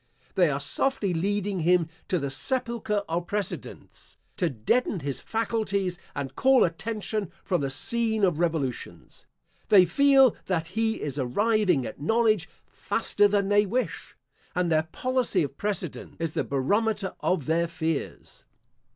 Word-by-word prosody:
They 180 -5 +3
are 140 -1 -1
softly 200 - 0
leading 200 +2 -1
him 170 0 +3 0.2
to 185 - +1
the 140 -4 -3
sepulchre 225 - -1
of 170 +1 -2
precedents, 205 0 -6 0.2
to 175 -4 +1
deaden 165 - 0
his 135 -2 -3
faculties 200 -5 -1 0.2
and 140 -2 -5
call 265 0 +5
attention 210 +2 -2
from 180 -5 0
the 140 - -1
scene 220 +9 0
of 175 -5 +2
revolutions. 160 -8 -3 0.4
They 190 -3 +7
feel 270 +5 +5
that 165 -3 -1
he 220 +3 -1
is 145 -1 -3
arriving 185 - +2
at 135 - -8
knowledge 215 0 +2 0.2
faster 205 0 +1
than 200 -1 +1
they 205 0 +4
wish, 250 +6 -3 0.4
and 180 -1 +1
their 155 0 +2
policy 255 -8 +1
of 140 -1 -5
precedents 195 -5 -4
is 165 -1 -2
the - - 0
barometer 200 +9 0
of 175 -7 0
their 170 +2 +1
fears. 160 -3 -4
190 Hz, 140 wpm, -26 LUFS, 160-220 Hz, 0.4 s, They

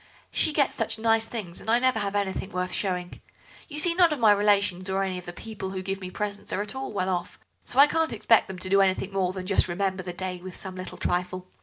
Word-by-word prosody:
She 315 - +2
gets 290 -2 +2
such 225 0 0
nice 225 0 +2
things, 200 -7 -5
and - - -7
I 230 - +5
never 255 -2 +2
have 200 -1 -2
anything 195 -1 -1
worth 180 -1 -2
showing. 180 -3 -2 0.5
You 300 - -6
see, 335 +3 +4
none 345 -2 +5
of 300 - 0
my 225 -4 +5
relations 200 -2 +2
or 190 +1 +1
any 185 -1 -2
of 180 - -12
the - - -4
people 200 0 -7
who 190 -1 -4
give 195 +1 -3
me 185 - -5
presents 205 +2 -4
are 205 - 0
at 210 - -4
all 265 0 -5
well 190 -3 -1
off, 180 -1 -3 0.3
so 245 - -6
I 280 - +10
can't 325 +2 0
expect 225 0 +3
them 190 - -7
to 185 +1 -5
do 195 +1 +5
anything 195 0 +1
more 185 -2 +1
than 185 -1 -6
just 195 0 +3
remember 190 +1 -1
the 180 -1 -5
day 180 0 -4
with 185 0 -8
some 190 - -5
little 185 0 -7
trifle. 180 +1 -2
195 Hz, 260 wpm, -26 LUFS, 185-220 Hz, 0.5 s, I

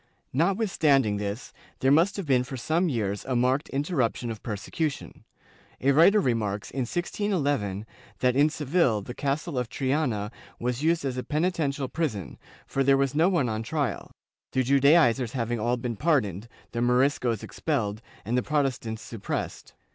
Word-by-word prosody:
^ - - -39 0.3
Notwithstanding 155 - +2
this, 100 +3 -5 0.3
there 135 - +3
must 165 +8 +4
have 195 - -3
been 130 -4 +3
for 130 +1 -6
some 165 +8 +1
years 105 -6 -2
a 130 - -1
marked 130 +4 +1
interruption 135 -5 -1
of 110 - -8
persecution. 120 - -4 0.5
A 135 - +3
writer 170 +9 +6
remarks, 110 - -1
in 125 -2 -2
1611, 145 - -1 0.3
that 125 -1 +2
in 145 +3 +5
Seville 150 - +1
the 120 - -7
Castle 140 +2 -2
of 125 -2 -3
Triana 130 -7 -1 0.3
was 125 +2 -2
used 165 -1 +1
as 130 -2 -2
a - - -3
peniten 160 -1 0
tial 140 -1 -4
prison, 135 - -3 0.3
for 135 - 0
there 135 0 +5
was 135 0 +1
no 165 +5 +4
one 170 -9 +1
on 110 -1 -2
trial, 145 +3 -2 0.4
the 130 - +2
Judaizers 135 -3 +4
having 120 -2 -1
all 120 +3 +1
been 120 -1 -3
pardoned, 115 - +1 0.2
the 120 - -2
Moriscos 125 -2 +2
expelled 110 -9 -2 0.2
and 115 +4 -1
the 125 - +3
Protestants 130 -6 -1
suppressed.' 115 -4 -5
130 Hz, 160 wpm, -27 LUFS, 115-150 Hz, 0.5 s, writer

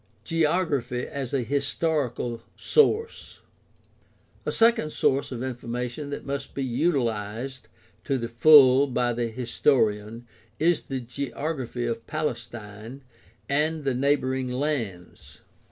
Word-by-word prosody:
Geography 155 -7 0
as 135 -3 -5
a 135 -3 0
historical 135 -3 -1
source. 455 0 +1 0.5
— - - -35
A - - +1
second 225 -9 +3
source 135 -1 +1
of 125 -1 -4
information 125 +2 -4
that 145 - -6
must 140 0 -4
be 140 - -2
utilized 125 -3 -1 0.4
to 135 - +1
the 115 -2 -3
full 135 +2 +7
by 120 -2 0
the 120 0 -1
historian 115 -2 0 0.3
is 170 +1 +2
the 135 -1 -4
geography 130 0 -4
of 115 -1 -4
Palestine 120 -3 -5 0.4
and 150 +2 0
the 135 -2 +1
neighboring 130 -1 0
lands. 125 - -4
130 Hz, 115 wpm, -26 LUFS, 120-145 Hz, 0.5 s, full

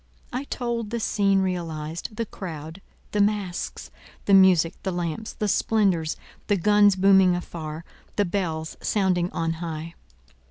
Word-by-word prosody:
I 260 +3 -3
told 235 -5 -3
the 235 +1 -2
scene 195 -3 +2
realized; 165 0 -4
the 230 +1 -2
crowd, 165 -3 -8 0.3
the 205 - +1
masques, 200 -4 -2 0.3
the 200 - +3
music, 185 -3 +6
the 190 - -2
lamps, 175 +4 -3
the 210 - -2
splendours, 190 -7 +1 0.3
the 205 - +2
guns 205 +2 +5
booming 190 -1 +5
afar, 165 -2 -6 0.3
the 205 - +2
bells 165 -4 -3
sounding 185 -4 +1
on 165 -2 -1
high. 165 0 -5
185 Hz, 135 wpm, -25 LUFS, 165-205 Hz, 0.3 s, music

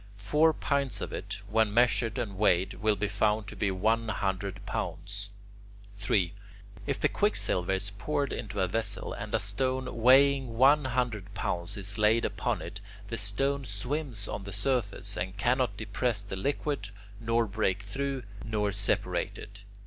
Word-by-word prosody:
Four 150 +10 +4
pints 140 -8 -1
of - - -4
it, - - -5
when 110 0 +2
measured 120 0 +3
and 110 -6 -3
weighed, 95 -1 +3
will 110 -1 +3
be 105 - -1
found 105 +1 +1
to - - -8
be 105 - 0
one 110 +5 +1
hundred 95 -1 -2
pounds. 95 +3 -4 0.6
3. 100 -3 +1 0.5
If - - -1
the - - +4
quicksilver 90 +1 +1
is 100 +2 -1
poured 140 +7 -1
into 100 -3 -3
a 95 - +2
vessel, 110 +4 -2
and 105 - -6
a - - +5
stone 130 +4 -1
weighing 130 -1 +5
one 140 +3 +6
hundred 120 -6 -1
pounds 90 +4 -2
is 100 +2 -3
laid 110 +2 +4
upon - - -1
it, 100 - -7 0.3
the 115 - -3
stone 135 +7 0
swims 120 +1 -3
on 100 - -4
the 100 - -7
surface, 100 -2 -1
and 95 +2 -3
cannot 125 +3 +1
depress 110 0 0
the 100 - -5
liquid, 140 0 -2 0.3
nor 115 +1 +2
break 100 -2 0
through, 135 +6 -3 0.2
nor 105 -2 0
separate 100 +1 -1
it. 100 0 -10
105 Hz, 160 wpm, -29 LUFS, 100-125 Hz, 0.6 s, one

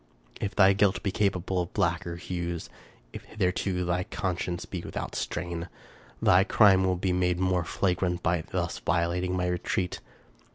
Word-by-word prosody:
If 100 - -3
thy 100 -1 +6
guilt 100 -1 +2
be 100 - 0
capable 95 -2 0
of 85 - -6
blacker 85 0 0
hues, 85 -1 -4 0.4
if - - -7
hitherto 90 -2 -1
thy 90 +1 0
con 95 -4 -2
science 85 0 -4
be 90 - -5
without - - -5
stain, 85 -1 -3 0.5
thy 90 +2 +5
crime 95 -2 +5
will 95 0 +2
be 90 +1 0
made 90 -1 +1
more 95 -1 +1
flagrant 90 0 -1
by 85 0 +1
thus 85 -2 -2
violating 90 +1 0
my 90 - 0
retreat. 90 0 -1
90 Hz, 160 wpm, -28 LUFS, 85-95 Hz, 0.5 s, thy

